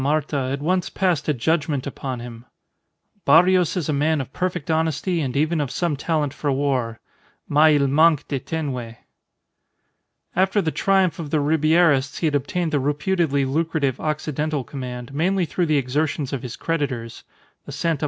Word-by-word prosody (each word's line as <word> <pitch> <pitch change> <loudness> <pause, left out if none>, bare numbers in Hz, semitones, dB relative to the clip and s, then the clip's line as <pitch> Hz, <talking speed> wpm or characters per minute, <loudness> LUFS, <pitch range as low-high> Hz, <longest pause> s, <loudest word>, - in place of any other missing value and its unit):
Marta 140 -1 0
had 140 +1 -3
once 180 +3 0
passed 175 -6 0
a - - +3
judgment 145 +1 0
upon 130 -3 -5
him: 120 0 -9 0.8
"Barrios 180 +1 +4
is 170 - -2
a 155 - 0
man 150 +2 +1
of 135 -1 -6
perfect 180 -3 -2
honesty 160 +2 0
and 135 -2 -2
even 155 +2 +1
of 140 - -2
some 170 +1 -1
talent 150 -1 -1
for 145 - -2
war, 130 -5 -1 0.5
mais 150 0 +5
il 140 - +2
manque 150 +2 +3
de 140 - -2
tenue." 130 -7 -4 1.4
After 190 +3 +2
the 165 -5 0
triumph 190 -4 +2
of 155 -3 -5
the 155 - +1
Ribierists 155 -2 +3
he - - -2
had 155 - +1
obtained 155 +4 -1
the 145 - +1
reputedly 145 0 0
lucrative 145 -2 -1
Occidental 150 -1 -2
command, 125 0 -7
mainly 180 +5 +1
through 175 +2 -1
the 155 -1 +3
exertions 140 +1 -1
of 135 - -2
his 125 -2 -6
creditors 135 -8 -3 0.4
(the - - -6
Sta. 165 -2 -1
150 Hz, 165 wpm, -22 LUFS, 135-165 Hz, 1.4 s, mais